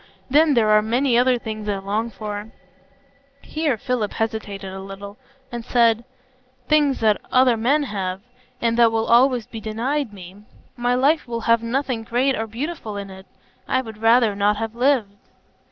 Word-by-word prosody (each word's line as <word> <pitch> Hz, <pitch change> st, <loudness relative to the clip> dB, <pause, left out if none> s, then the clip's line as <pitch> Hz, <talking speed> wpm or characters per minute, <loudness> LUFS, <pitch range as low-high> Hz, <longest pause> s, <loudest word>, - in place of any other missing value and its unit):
Then 300 Hz, 0 st, +5 dB
there 220 Hz, -3 st, +3 dB
are 215 Hz, 0 st, +6 dB
many 240 Hz, +4 st, +1 dB
other 250 Hz, +1 st, +4 dB
things 215 Hz, -2 st, -6 dB
I 200 Hz, -, 0 dB
long 205 Hz, +4 st, -2 dB
for,"—here 270 Hz, +7 st, -7 dB
Philip 240 Hz, -2 st, -2 dB
hesitated 205 Hz, -4 st, -4 dB
a 190 Hz, -, -7 dB
little, 200 Hz, +1 st, -9 dB, 0.3 s
and 240 Hz, -1 st, -5 dB
then -, -, -16 dB
said,—"things 255 Hz, +4 st, 0 dB
that 215 Hz, -2 st, +2 dB
other 255 Hz, -2 st, +4 dB
men 270 Hz, +7 st, +2 dB
have, 195 Hz, -6 st, -4 dB, 0.4 s
and 230 Hz, 0 st, 0 dB
that 230 Hz, -1 st, +6 dB
will 225 Hz, 0 st, 0 dB
always 245 Hz, -1 st, +4 dB
be 230 Hz, -2 st, -9 dB
denied 235 Hz, +5 st, -2 dB
me. 190 Hz, -1 st, -11 dB, 0.4 s
My 245 Hz, 0 st, 0 dB
life 280 Hz, +5 st, +2 dB
will 235 Hz, -1 st, -4 dB
have 230 Hz, 0 st, +3 dB
nothing 250 Hz, 0 st, -2 dB
great 255 Hz, +4 st, +1 dB
or 225 Hz, -, -3 dB
beautiful 230 Hz, -2 st, -5 dB
in 200 Hz, -1 st, -6 dB
it; 190 Hz, 0 st, -12 dB, 0.4 s
I 260 Hz, -, +1 dB
would 220 Hz, -4 st, -10 dB
rather 225 Hz, -2 st, +4 dB
not 205 Hz, +1 st, +2 dB
have 225 Hz, 0 st, -4 dB
lived." 240 Hz, -4 st, +1 dB
230 Hz, 165 wpm, -22 LUFS, 215-255 Hz, 0.4 s, are